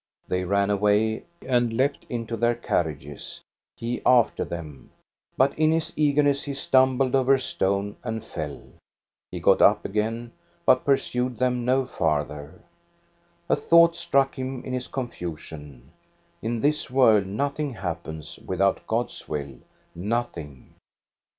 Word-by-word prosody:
They 90 Hz, 0 st, -1 dB
ran 100 Hz, +2 st, +2 dB
away 105 Hz, +2 st, +2 dB, 0.2 s
and 120 Hz, -3 st, +1 dB
leaped 135 Hz, +4 st, 0 dB
into 115 Hz, -1 st, -3 dB
their 120 Hz, +1 st, +2 dB
carriages, 75 Hz, -, -3 dB, 0.3 s
he 120 Hz, +1 st, -4 dB
after 125 Hz, -2 st, +4 dB
them; 75 Hz, -5 st, -8 dB, 0.5 s
but 135 Hz, +2 st, +4 dB
in 155 Hz, 0 st, +4 dB
his 160 Hz, 0 st, -1 dB
eagerness 145 Hz, -1 st, +3 dB
he 140 Hz, -1 st, -5 dB
stumbled 130 Hz, -1 st, +3 dB
over 135 Hz, 0 st, +4 dB
a -, -, -2 dB
stone 100 Hz, -4 st, -1 dB
and 110 Hz, -2 st, -4 dB
fell. 75 Hz, -3 st, -6 dB, 0.7 s
He -, -, -6 dB
got -, -, +4 dB
up -, -, +5 dB
again, 115 Hz, +3 st, -2 dB, 0.3 s
but 130 Hz, 0 st, +4 dB
pursued 125 Hz, -3 st, 0 dB
them 125 Hz, 0 st, 0 dB
no 130 Hz, +1 st, +2 dB
farther. 75 Hz, -5 st, -2 dB, 0.9 s
A -, -, +3 dB
thought 170 Hz, 0 st, +5 dB
struck 135 Hz, -3 st, +1 dB
him 130 Hz, -1 st, -4 dB
in 130 Hz, -, -4 dB
his 125 Hz, -1 st, -3 dB
confusion. 80 Hz, -, -7 dB, 0.5 s
In 115 Hz, 0 st, -2 dB
this 150 Hz, +1 st, +1 dB
world 110 Hz, -7 st, +4 dB
nothing 140 Hz, +6 st, -2 dB
happens 80 Hz, -5 st, -6 dB
without 95 Hz, +1 st, 0 dB
God's 115 Hz, +2 st, -3 dB
will, 70 Hz, -3 st, -4 dB, 0.3 s
nothing. 85 Hz, -, -4 dB
115 Hz, 130 wpm, -25 LUFS, 90-130 Hz, 0.9 s, up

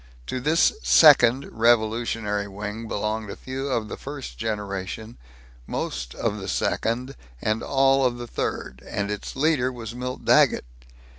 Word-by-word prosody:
To 130 Hz, -, -3 dB
this 155 Hz, +6 st, +3 dB
second, 135 Hz, -4 st, +6 dB
revolutionary 110 Hz, -2 st, +1 dB
wing 105 Hz, +3 st, -6 dB
belonged 105 Hz, 0 st, -2 dB
a -, -, -5 dB
few 130 Hz, +1 st, -5 dB
of 115 Hz, -5 st, -1 dB
the -, -, -6 dB
first 140 Hz, -1 st, -7 dB
generation, 105 Hz, 0 st, -4 dB, 0.5 s
most -, -, -4 dB
of -, -, -2 dB
the -, -, -6 dB
second, 125 Hz, +4 st, -1 dB, 0.2 s
and 110 Hz, -, 0 dB
all 135 Hz, 0 st, +3 dB
of 125 Hz, -1 st, +1 dB
the 120 Hz, -, -6 dB
third; 65 Hz, -, -4 dB
and 100 Hz, 0 st, -2 dB
its 105 Hz, -, -5 dB
leader 135 Hz, -3 st, +2 dB
was 115 Hz, -3 st, -7 dB
Milt 125 Hz, +1 st, -5 dB
Daggett. -, -, +4 dB
115 Hz, 145 wpm, -24 LUFS, 105-130 Hz, 0.5 s, second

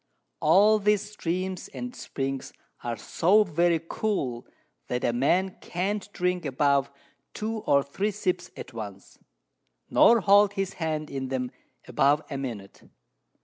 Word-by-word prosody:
All 205 Hz, +7 st, +5 dB
these 210 Hz, 0 st, +1 dB
Streams 185 Hz, -1 st, -3 dB
and 245 Hz, 0 st, -7 dB
Springs 135 Hz, -1 st, -4 dB, 0.3 s
are 120 Hz, -1 st, -3 dB
so 195 Hz, -, +3 dB
very 170 Hz, -2 st, +2 dB
cool, 135 Hz, -, -2 dB, 0.4 s
that 125 Hz, 0 st, -2 dB
a 120 Hz, -, +1 dB
Man 180 Hz, +10 st, +1 dB
can't 200 Hz, +3 st, -3 dB
drink 180 Hz, -1 st, -1 dB
above 140 Hz, -1 st, +2 dB, 0.5 s
2 220 Hz, +1 st, -3 dB
or 140 Hz, -8 st, +3 dB
3 190 Hz, +10 st, -2 dB
Sips 185 Hz, -3 st, -2 dB
at 130 Hz, -, -9 dB
once, 100 Hz, -4 st, -9 dB, 0.7 s
nor 230 Hz, -1 st, +6 dB
hold 200 Hz, +1 st, +5 dB
his 195 Hz, -2 st, -2 dB
Hand 155 Hz, -1 st, -2 dB
in 135 Hz, -1 st, -3 dB
them 130 Hz, -1 st, -2 dB, 0.4 s
above 145 Hz, +2 st, +3 dB
a 140 Hz, -, -2 dB
Minute. 115 Hz, -8 st, -7 dB
170 Hz, 135 wpm, -27 LUFS, 135-200 Hz, 0.7 s, nor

